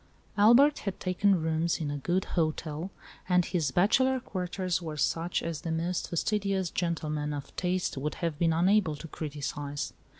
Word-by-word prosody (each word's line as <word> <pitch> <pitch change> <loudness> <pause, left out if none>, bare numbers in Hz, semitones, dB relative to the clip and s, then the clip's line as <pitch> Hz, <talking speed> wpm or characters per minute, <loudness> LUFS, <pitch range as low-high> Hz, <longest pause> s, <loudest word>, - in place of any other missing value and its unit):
Albert 240 +8 +6
had 195 -2 -4
taken 185 +1 +2
rooms 160 +1 0
in 150 -3 -2
a 145 - -3
good 180 +6 0
hotel, 160 0 -1 0.4
and 180 -1 +4
his 165 -6 0
bachelor 255 - +3
quarters 185 -4 -2
were 155 -3 -5
such 165 +3 0
as 165 -2 -3
the 165 - -4
most 170 +2 -1
fastidious 195 0 0
gentleman 155 -4 -2
of 145 -1 -7
taste 180 -4 -1
would 150 +3 -2
have 165 -4 -3
been 165 -1 +3
unable 180 0 +3
to 165 - -9
criticise. 145 -2 -4
170 Hz, 160 wpm, -29 LUFS, 155-185 Hz, 0.4 s, Albert